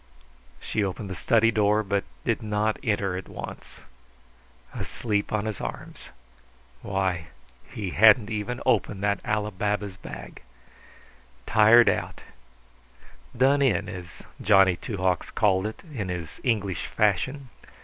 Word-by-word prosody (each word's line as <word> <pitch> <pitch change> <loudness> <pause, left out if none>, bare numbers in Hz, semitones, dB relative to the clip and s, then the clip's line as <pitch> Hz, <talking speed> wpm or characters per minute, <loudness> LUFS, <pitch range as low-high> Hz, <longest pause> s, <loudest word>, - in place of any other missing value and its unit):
She 105 - -2
opened 95 +1 -4
the - - -4
study 115 +2 +3
door, 105 -1 +2
but 100 0 -1 0.2
did - - 0
not 105 0 -1
enter 100 -4 0
at 95 - -6
once. - - -9 0.9
Asleep 105 -3 -2
on 105 -1 -1
his 110 -3 -4
arms. - - -7 0.7
Why, 95 -4 -2 0.4
he 100 -4 -4
hadn't 110 +2 +5
even 110 +4 -3
opened 100 -1 +1
that 100 -1 0
Ali 105 -2 -1
Baba's 100 0 -2
bag! - - -10 1.0
Tired 110 +2 +6
out - - -1 1.2
done 135 +3 +4
in, 105 -8 +2
as 90 -4 -9 0.2
Johnny 95 -3 +5
Two 105 +4 -6
Hawks 90 -2 0
called 95 -1 +2
it 110 - -9
in 100 -8 -4
his 85 -4 -6
English 100 -7 -1
fashion. 125 +7 0
105 Hz, 130 wpm, -26 LUFS, 95-110 Hz, 1.2 s, Tired